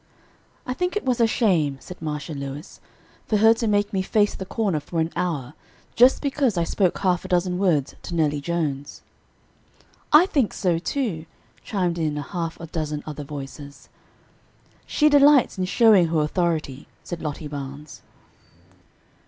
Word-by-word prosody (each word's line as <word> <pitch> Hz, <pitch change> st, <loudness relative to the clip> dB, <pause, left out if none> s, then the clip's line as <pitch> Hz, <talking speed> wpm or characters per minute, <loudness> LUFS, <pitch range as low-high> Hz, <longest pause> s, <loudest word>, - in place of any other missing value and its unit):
"I 255 Hz, -, -2 dB
think 360 Hz, +7 st, -2 dB
it 420 Hz, -, -2 dB
was 250 Hz, -2 st, +1 dB
a 230 Hz, -, +5 dB
shame," 170 Hz, -, +1 dB
said 180 Hz, -, -11 dB
Marcia 150 Hz, -1 st, -4 dB
Lewis, 140 Hz, +3 st, -7 dB, 0.5 s
"for 215 Hz, -, +2 dB
her 220 Hz, +2 st, +6 dB
to 230 Hz, 0 st, -3 dB
make 205 Hz, -1 st, +1 dB
me 190 Hz, -, +1 dB
face 205 Hz, +2 st, +1 dB
the 190 Hz, -, -7 dB
corner 200 Hz, -9 st, -1 dB
for 165 Hz, +3 st, -4 dB
an 160 Hz, +1 st, 0 dB
hour, 150 Hz, -7 st, -2 dB, 0.4 s
just 250 Hz, +5 st, +5 dB
because 275 Hz, -7 st, 0 dB
I 170 Hz, -, +2 dB
spoke 180 Hz, +1 st, 0 dB
half 180 Hz, -2 st, 0 dB
a -, -, -7 dB
dozen 180 Hz, 0 st, 0 dB
words 160 Hz, -8 st, +1 dB
to 175 Hz, -, -6 dB
Nellie 150 Hz, -3 st, +1 dB
Jones." 145 Hz, -4 st, -3 dB, 1.1 s
"I 310 Hz, +4 st, +8 dB
think 275 Hz, -, 0 dB
so, 175 Hz, -4 st, 0 dB
too," 180 Hz, -, -3 dB, 0.4 s
chimed 180 Hz, -5 st, -1 dB
in 155 Hz, -2 st, -1 dB
a 145 Hz, -, -3 dB
half 165 Hz, 0 st, -5 dB
a 165 Hz, -, -7 dB
dozen 155 Hz, -2 st, -4 dB
other 150 Hz, -1 st, -6 dB
voices. 140 Hz, 0 st, -9 dB, 1.0 s
"She 300 Hz, -, +3 dB
delights 285 Hz, -6 st, +5 dB
in 185 Hz, -, 0 dB
showing 200 Hz, -3 st, +5 dB
her 160 Hz, -1 st, +1 dB
authority," 155 Hz, -4 st, -2 dB, 0.2 s
said 175 Hz, -2 st, -6 dB
Lottie 150 Hz, 0 st, -5 dB
Barnes. 145 Hz, +1 st, -8 dB
170 Hz, 160 wpm, -23 LUFS, 150-210 Hz, 1.1 s, I